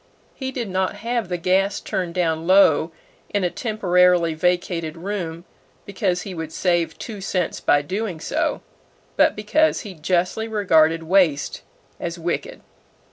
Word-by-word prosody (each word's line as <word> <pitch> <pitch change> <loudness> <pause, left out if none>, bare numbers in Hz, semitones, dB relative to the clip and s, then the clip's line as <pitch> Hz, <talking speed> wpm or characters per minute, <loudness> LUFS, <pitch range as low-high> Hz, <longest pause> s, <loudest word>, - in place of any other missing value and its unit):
He 265 -1 -5
did 245 -4 -4
not 190 +1 -1
have 230 -1 -2
the 180 - -1
gas 190 +3 +1
turned 180 -2 -3
down 165 -2 0
low 180 -4 +5 0.4
in 205 -2 -1
a 175 - +1
temporarily 180 -6 +2
vacated 170 -1 -1
room 175 -2 -5 0.4
because 190 -3 -1
he 195 - -6
would 160 -2 -6
save 175 -1 0
two 210 -4 -7
cents 185 -3 -2
by 145 0 +3
doing 190 +1 -3
so, 310 - -1 0.5
but - - +4
because 300 +10 +2
he 205 -5 -8
justly 180 +6 -1
regarded 165 -7 +3
waste 165 -5 +2 0.4
as 170 0 -4
wicked. 175 - -3
180 Hz, 140 wpm, -22 LUFS, 170-205 Hz, 0.5 s, low